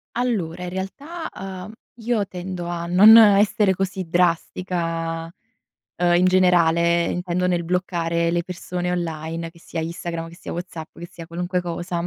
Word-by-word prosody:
Allora 190 -9 -1
in 180 - -4
realtà, 280 - -6
ehm, 190 +1 -7 0.3
io 225 -3 0
tendo 180 -1 -6
a 170 -1 -3
non 205 +6 +8
essere 205 -1 +5
così 190 -1 -3
drastica, 165 -1 -1 0.7
ehm, 175 0 +2
in 180 - +3
generale 170 -2 +4
intendo 180 +1 -1
nel 175 -1 0
bloccare 170 -1 0
le 170 0 0
persone 180 0 -4
online, 165 -1 -3
che 170 - -20
sia 165 0 -5
Instagram, 165 0 -5
che 170 - -13
sia - - -8
WhatsApp, 170 -2 -7
che 175 +1 -8
sia 165 -3 -10
qualunque 180 +2 -2
cosa. 175 0 -3
175 Hz, 150 wpm, -22 LUFS, 170-185 Hz, 0.7 s, non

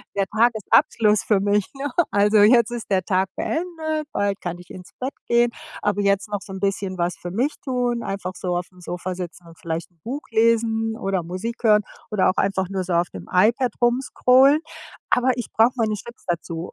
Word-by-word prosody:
der 195 - +1
Tages-Abschluss 220 -1 +3
für 205 -3 +2
mich, 205 0 +1
ne? 280 +1 -3 0.2
Also, 205 +1 +3
jetzt 235 +2 +5
ist 240 -3 -6
der 185 -2 +2
Tag 190 0 +1
beendet, 315 -3 -3
bald 200 -1 -1
kann 175 -1 -4
ich 180 - -15
ins 180 -1 -11
Bett 260 +3 -3
gehen, 235 0 +3 0.3
aber 205 0 0
jetzt 200 +1 +1
noch 205 -1 -3
so 195 - -11
‘n 190 - -6
bisschen 195 -1 -2
was 175 0 -1
für 175 - -7
mich 255 +9 0
tun, 245 -3 -1
einfach 195 -2 -4
so 180 -1 -2
aufm 180 +1 -7
Sofa 180 +1 -5
sitzen 175 -1 -8
und 165 0 -15
vielleicht 165 +1 -4
‘n 170 - -36
Buch 275 +6 -4
lesen 225 0 +2
oder 195 -5 -1
Musik 205 +8 -5
hören 210 -1 +5 0.3
oder 195 -3 +3
auch 185 - 0
einfach 190 -2 +1
nur 190 -1 -2
so 180 -1 -3
auf 170 +1 +2
dem - - -9
iPad 225 +6 +3
rum 240 +2 +3
scrollen, 270 +3 +4 0.5
aber 250 +1 +3
ich 240 - -4
brauche 225 +3 +4
meine 220 -3 0
Chips 235 +3 -9
dazu, 170 0 -3
205 Hz, 200 wpm, -22 LUFS, 185-235 Hz, 0.5 s, jetzt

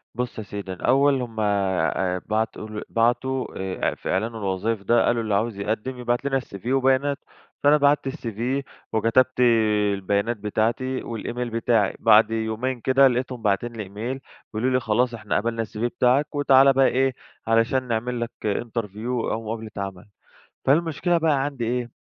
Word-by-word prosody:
بُص 125 -1 -3
يا 110 - -4
سيدي، 100 -1 -6
الأول 135 +6 +2
هم 115 -2 -6
آآ 95 -2 0
بعتوا 110 0 -1
ال 105 0 -6
بعتوا 125 +3 +1
آآ 95 -1 -3
إع - - -4
في - - -7
إعلان 110 +5 -1
الوظايف 100 +1 -2
ده، 120 +4 +3
قالوا: 120 -1 +1
"اللي 105 -2 -2
عاوز 105 -1 -1
يقدّم، 110 +5 -3
يبعت 120 +2 -1
لنا 135 -1 +1
الCV 105 -2 -10
وبياناته." 135 +2 +2 0.4
فأنا 145 +1 +6
بَعتّ 145 -1 +2
الCV، 115 -7 -6 0.5
وكتبت 120 +4 +2 0.5
البيانات 100 +4 -1
بتاعتي، 115 +5 -1
والإيميل 120 +1 -4
بتاعي. 115 -2 +1
بعد 110 0 +5
يومين 115 +3 -2
كده، 135 +1 +5
لقيتهم 125 -1 -2
باعتين 105 +3 0
لي 110 -2 -5
إيميل، 110 +7 -5 0.3
بيقولوا 125 +4 0
لي 130 - +3
خلاص 120 +1 +1
إحنا 110 -2 -2
قبلنا 115 +1 -1
الCV 105 - -10
بتاعك، 135 +5 +1
وتعالَ 135 -1 +5
بقى 135 0 +4
إيه، 135 0 +1 0.3
علشان 115 +3 +2
نعمل 120 +1 -2
لك 115 - -3
interview، 110 0 -3 0.2
أو 115 +1 -3
مقابلة 110 0 -5
عمل. 95 -2 -5 0.6
فالمشكلة 165 +3 +2
بقى 150 -4 +2
عندي 135 -5 -3
إيه، 120 0 -2
115 Hz, 160 wpm, -24 LUFS, 110-130 Hz, 0.6 s, فأنا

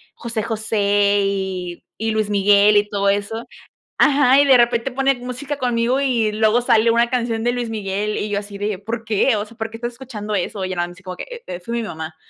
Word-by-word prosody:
José 230 -2 -4
José 205 -2 +1
y 190 -3 -3
y 225 +1 -1
Luis 215 -1 -1
Miguel 205 +1 +5
y 205 0 +2
todo 200 -1 +1
eso. 205 +3 -2 0.5
Ajá, 275 -2 +5
y - - +3
de 265 -2 +7
repente 240 +1 +2
pone 270 +2 +2
música 255 +4 -5
conmigo 245 0 +1
y 240 -6 +1
luego 220 +2 +2
sale 230 -1 +3
una 235 +1 +3
canción 235 -3 -1
de 240 - +2
Luis 245 -1 -3
Miguel 210 -1 -2
y 210 - -3
yo 205 -1 0
así 200 0 -9
de: 205 -1 -3
“¿Por 225 +2 -5
qué? 220 +3 +2
O 205 0 -2
sea, 230 - -16
¿por 225 -1 -3
qué 225 - -9
estás 240 +1 -5
escuchando 225 -5 -6
eso?”. 190 +1 -2
Y - - -4
ya 185 - -3
nada 175 0 0
más 175 - -12
así 185 - -19
como 185 -1 -7
que: - - -6 0.2
"Eh-eh, 175 - -5
fue 210 +6 -7
mi 235 - -1
mamá" 160 -5 -6
220 Hz, 235 wpm, -20 LUFS, 200-240 Hz, 0.5 s, de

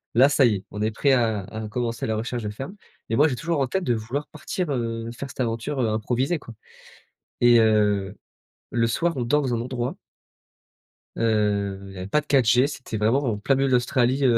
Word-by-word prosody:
Là, 135 +4 +7
ça 145 -3 +4
y 110 -3 +3
est, 95 - -12
on 105 - -6
est 110 - +1
prêt 135 +6 +2
à 115 -4 +2
à 110 +3 -6
commencer 115 0 -2
la 110 - -1
recherche 115 +1 -3
de 105 - -2
ferme. 135 - -7 0.3
Et 115 - +1
moi, 150 +5 +5
j'ai 130 - -1
toujours 160 +5 -1
en 135 - +1
tête 190 +7 -1
de 120 -7 +1
vouloir 120 +7 -4
partir, 155 +1 -4
heu, 115 -2 -2
faire 135 +3 -7
cette - - -13
aventure, 120 +4 -2
heu, 115 - +2
improvisée, 125 +9 0
quoi. 120 -5 -11 0.9
Et 120 -1 +6
heu, 105 -3 +2 0.5
le 115 -1 +2
soir, 165 +8 0
on 125 - -2
dort 145 +5 +2
dans 125 -2 -1
un 115 - -1
endroit 125 +4 -3 1.2
heu, 105 -3 +1
il - - -11
y - - -9
avait 90 +1 -5
pas 150 +8 +2
de - - -23
4G, 125 -1 +4
c'était 130 -6 -6
vraiment 115 +7 +2
en 115 -5 -1
plein 135 +6 +1
milieu 135 +1 +1
de - - +1
l'Australie, 125 +2 +2
heu, 120 -2 +5
120 Hz, 225 wpm, -24 LUFS, 110-135 Hz, 1.2 s, Là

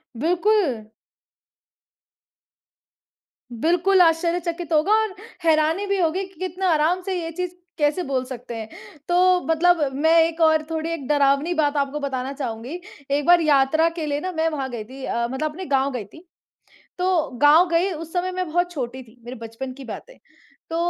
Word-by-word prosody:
बिल्कुल। 335 - +1 2.7
बिल्कुल 350 +9 +3
आश्चर्यचकित 340 0 +1
होगा 310 +6 +3
और 435 -3 -3 0.3
हैरानी 320 +4 +2
भी 395 0 0
होगी 350 +2 +1
कि 380 - -22
कितना 370 +1 -2
आराम 330 +3 +2
से 385 +1 -4
ये 330 - -4
चीज़ 360 +2 -4 0.3
कैसे 295 +4 +1
बोल 270 -4 -1
सकते 245 -2 -8
हैं। 220 -1 -6 0.4
तो 360 +1 +4
मतलब 345 +2 +3 0.2
मैं 320 +4 +3
एक 330 0 -2
और 315 -1 +4
थोड़ी 320 0 -2
एक 305 -6 -5
डरावनी 285 +3 +2
बात 300 -3 +1
आपको 280 +1 -1
बताना 270 -1 -3
चाहूँगी। 255 +3 -5 0.3
एक 285 0 +1
बार 350 0 +6
यात्रा 310 +2 +3
के 310 - -2
लिए 290 -1 -1
ना 370 +4 -4
मैं 325 -2 0
वहाँ 275 -4 -4
गई 235 -3 -5
थी 260 +5 -11
अ, 235 0 -1
मतलब 305 +4 -2
अपने 370 +5 -8
गाँव 275 -2 +1
गई 245 -5 -5
थी। 320 - -16 0.7
तो 360 -4 +1
गाँव 315 +5 +6
गई 340 +3 +2
उस 330 0 -8
समय 365 +1 -1
मैं 365 0 -2
बहुत 350 +2 +1
छोटी 260 -4 -5
थी 240 0 -20
मेरे 245 +2 -7
बचपन 230 +3 -7
की 275 +1 -11
बात 230 - -7
है। - - -17 0.5
तो 325 - -2
315 Hz, 175 wpm, -22 LUFS, 270-350 Hz, 2.7 s, बार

